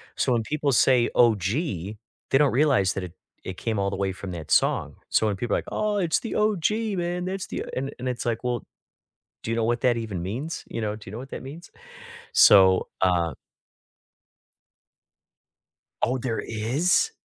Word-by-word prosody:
So 125 - +1
when 115 -2 +1
people 145 +1 -1
say 125 0 +4
OG, 115 -6 +4 0.9
they 135 - +5
don't 145 -1 +4
realize 130 -9 +3
that 95 - -4
it 90 -2 -8 0.3
it 95 -1 -6
came 110 -3 -2
all 100 0 +1
the - - -4
way 95 0 -1
from 95 0 -7
that 85 -4 -7
song. - - +2
So 110 - +2
when 105 - 0
people 100 +3 -1
are - - +1
like, - - -9
"Oh, 210 -1 0
it's 175 -4 +1
the 230 - -5
OG, 210 -6 +1 0.3
man. 175 +1 -2
That's 190 0 -4
the" - - -4
and 135 +1 -3
and 125 +1 -2
it's 125 -1 -4
like, 115 0 -1
"Well, 120 -2 -2 0.8
do 115 - -4
you 115 - 0
know 115 - +1
what 120 +1 0
that 120 -2 +2
even 110 -6 -4
means, 130 - -4
you 115 - -4
know? 105 -1 -2
Do 105 - -12
you - - -10
know 115 - -6
what 130 +2 -9
that - - -6
means?" 155 +7 -10 0.6
So, 95 -2 +6
uh 90 -3 +2 2.7
Oh, 125 +2 +2
there 120 -2 -2
is? 130 - +1
120 Hz, 190 wpm, -25 LUFS, 100-145 Hz, 2.7 s, So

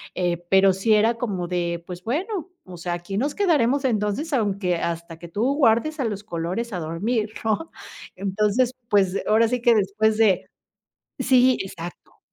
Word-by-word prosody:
eh, 175 -2 0
pero 195 0 +6
sí 215 +4 +2
era 225 +2 +3
como 195 -7 -3
de: 170 -1 -2
"Pues 180 0 -8
bueno, 350 - -3 0.2
o 180 -2 -10
sea, 175 +1 -3
aquí 175 +3 -5
nos 285 +3 -1
quedaremos 285 - +2
entonces 225 +7 -1
aunque 200 -7 0
hasta 170 -1 -4
que 170 - -9
tú 230 +11 0
guardes 280 +3 +2
a 255 - 0
los 205 -2 -3
colores 190 +5 -4
a 180 - -2
dormir", 210 +8 -2
¿no?, 225 +10 -1 0.4
entonces, 210 +6 0 0.2
pues 200 -2 +2
ahora 225 +1 +4
sí 250 +1 -1
que 240 -1 +5
después 215 +2 +1
de 200 -5 +2 0.7
sí, 255 0 +4
exacto. 175 -2 -10
210 Hz, 165 wpm, -23 LUFS, 180-240 Hz, 0.7 s, pero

